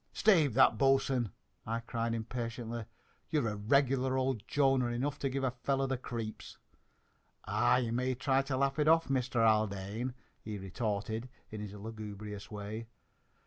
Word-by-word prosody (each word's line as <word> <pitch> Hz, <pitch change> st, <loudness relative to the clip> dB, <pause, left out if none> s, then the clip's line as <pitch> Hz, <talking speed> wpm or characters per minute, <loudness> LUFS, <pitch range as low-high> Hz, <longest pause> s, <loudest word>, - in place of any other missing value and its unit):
"Stave 160 Hz, -, +4 dB
that, 125 Hz, -4 st, +5 dB
bo'sun!" 135 Hz, -4 st, +3 dB, 0.3 s
I 115 Hz, +1 st, -2 dB
cried 115 Hz, 0 st, -2 dB
impatiently. 115 Hz, 0 st, -4 dB, 0.4 s
"You're 145 Hz, -8 st, +1 dB
a 105 Hz, -, -3 dB
regular 130 Hz, +4 st, +2 dB
old 130 Hz, -4 st, 0 dB
Jonah, 135 Hz, -3 st, +3 dB
and 120 Hz, -, -2 dB
enough 140 Hz, +4 st, -2 dB
to 135 Hz, -, 0 dB
give 135 Hz, +1 st, -2 dB
a 130 Hz, -, +2 dB
fellow 135 Hz, +2 st, 0 dB
the 135 Hz, 0 st, 0 dB
creeps!" 115 Hz, -3 st, -6 dB, 0.9 s
"Ah, -, -, +3 dB
you 120 Hz, -3 st, 0 dB
may 125 Hz, +2 st, 0 dB
try 135 Hz, +1 st, +2 dB
to 135 Hz, -1 st, -2 dB
laugh 135 Hz, +2 st, +1 dB
it 150 Hz, -, +3 dB
off, 165 Hz, -2 st, +4 dB
Mister 125 Hz, -3 st, +2 dB
Haldane," 110 Hz, +3 st, +1 dB, 0.3 s
he 105 Hz, -1 st, -5 dB
retorted 110 Hz, +4 st, -3 dB, 0.2 s
in 110 Hz, -1 st, -5 dB
his 105 Hz, -1 st, -6 dB
lugubrious 105 Hz, -1 st, -7 dB
way. 105 Hz, +2 st, -6 dB
120 Hz, 155 wpm, -33 LUFS, 110-135 Hz, 0.9 s, that